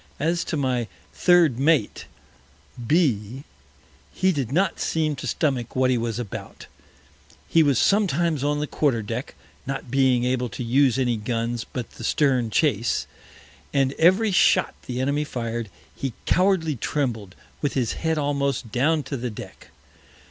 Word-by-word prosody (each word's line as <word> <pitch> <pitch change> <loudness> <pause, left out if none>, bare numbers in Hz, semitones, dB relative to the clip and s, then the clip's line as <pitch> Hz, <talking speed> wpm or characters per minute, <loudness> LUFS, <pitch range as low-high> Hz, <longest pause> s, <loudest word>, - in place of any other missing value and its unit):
As 165 +3 0
to 160 - -2
my 125 -4 0 0.3
Third 170 -9 +4
Mate, 145 -6 +1 0.8
B 125 - +1
s, 140 - -10 0.7
he 190 0 +1
did 135 -8 -3
not 190 +7 +1
seem 155 -2 0
to - - -5
stomach 130 -7 -1
what 130 0 +3
he 125 - +2
was 115 -1 -2
about; 120 -5 -7 0.8
he 165 - +4
was 140 -5 +3
sometimes 170 - +2
on 145 0 0
the 150 - -1
Quarter 135 -7 0
Deck 115 +5 -5 0.3
(not 135 -3 -5
being 130 -2 +3
able 125 -1 0
to 125 - -6
use 130 +1 +3
any 125 -3 +1
Guns 115 +2 -3
but 125 -3 -4
the - - -11
Stern 130 -2 +2
Chase) 120 -2 +1 0.7
and 135 -1 +2
every 190 +6 +4
Shot 185 - +3
the 125 0 -3
Enemy 140 +3 0
fir'd, 115 -5 -4 0.3
he 135 -3 -4
cowardly 180 -6 +2
trembled, 115 -8 -2 0.3
with 145 - -1
his 125 -4 0
Head 160 -1 -1
almost 140 -5 -1
down 150 +5 +1
to 140 - -5
the 125 -1 -3
Deck. 105 - -11
135 Hz, 155 wpm, -24 LUFS, 120-155 Hz, 0.8 s, Third